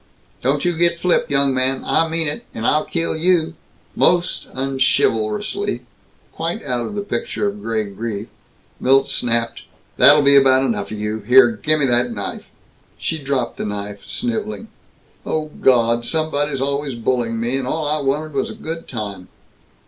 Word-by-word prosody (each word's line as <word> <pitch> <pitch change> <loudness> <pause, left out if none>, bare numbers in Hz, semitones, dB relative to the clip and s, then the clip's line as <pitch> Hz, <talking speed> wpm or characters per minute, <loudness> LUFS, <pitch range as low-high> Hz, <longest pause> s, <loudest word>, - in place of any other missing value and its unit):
"Don't 140 +4 0
you 175 -1 +1
get 170 +1 +2
flip, 180 0 +1
young 140 -1 +3
man! 130 +1 0
I 165 - +2
mean 165 0 -1
it! 145 - -3
And 115 - -4
I'll 155 +4 +2
kill 165 -1 -2
you 165 0 +2 0.2
" - - -34
Most 175 0 -2
unchivalrously, 130 -5 0 0.5
quite 165 -1 -4
out 125 -3 -2
of 210 - -7
the 205 - -2
picture 205 0 -2
of 205 +1 -5
gray 110 - -1
grief, 105 +1 -5 0.5
Milt 135 +1 +3
snapped, 115 -1 -1 0.4
"That'll 145 +1 +7
be 140 0 +6
about 135 -1 +5
enough 110 -5 -2
of 110 - -6
you! 105 +1 -3
Here! 120 +3 +6
Gimme 145 +7 +1
that 120 -1 +2
knife!" - - -6 0.5
She 160 - -3
dropped 135 -4 -2
the - - -3
knife, 100 0 -5
sniveling, 225 -2 -3 0.5
"Oh 155 -1 -3
Gawd, 120 -2 +3
somebody's 145 -1 -1
always 140 -1 -1
bullying 115 -1 -1
me! 120 +3 -1
And 130 -2 -3
all 155 +2 -1
I 150 +1 0
wanted 145 +3 -1
was 135 - -1
a - - -8
good 165 +1 -6
time!" 100 -6 -6
135 Hz, 165 wpm, -20 LUFS, 120-155 Hz, 0.5 s, That'll